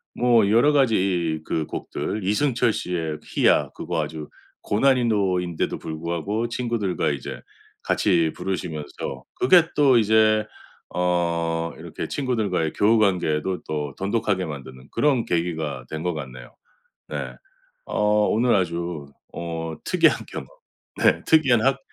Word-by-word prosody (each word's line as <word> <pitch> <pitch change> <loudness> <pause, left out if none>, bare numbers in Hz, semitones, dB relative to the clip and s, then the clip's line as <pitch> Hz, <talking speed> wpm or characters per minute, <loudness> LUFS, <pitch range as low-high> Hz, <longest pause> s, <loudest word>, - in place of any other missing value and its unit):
뭐 120 -4 +4
여러 120 +8 +5
가지 95 - +2
그 80 -2 -2
곡들, 105 - -4
이승철 115 +3 +1
씨의 80 -5 -3
희야 - - +3
그거 - - -2
아주 80 -1 -6 0.3
고난이도인데도 100 -8 +1
불구하고 85 +8 -3
친구들과 115 -9 -1
이제 70 -2 -5 0.4
같이 85 -6 +2
부르시면서 80 -5 -5
그게 170 +6 +5
또 135 -5 +5
이제 110 0 +3 0.5
어 85 -2 0
이렇게 - - -6
친구들과의 105 - -1
교우 110 +3 +3
관계도 90 -4 +1
또 75 -2 -3
돈독하게 100 -1 0
만드는 65 -3 -9
그런 140 -5 +2
계기가 80 -7 -2
된 80 0 -4
것 90 0 -2
같네요. 65 -5 -9 0.5
네. - - -4 0.5
어 - - -3 0.3
오늘 120 +2 +3
아주 85 -4 -2 0.3
어 80 -1 -4
특이한 - - +3
경험. - - -6 0.5
네 - - +3
특이한 135 -7 +4
학 135 0 +3
90 Hz, 265 characters per minute, -23 LUFS, 80-115 Hz, 0.5 s, 여러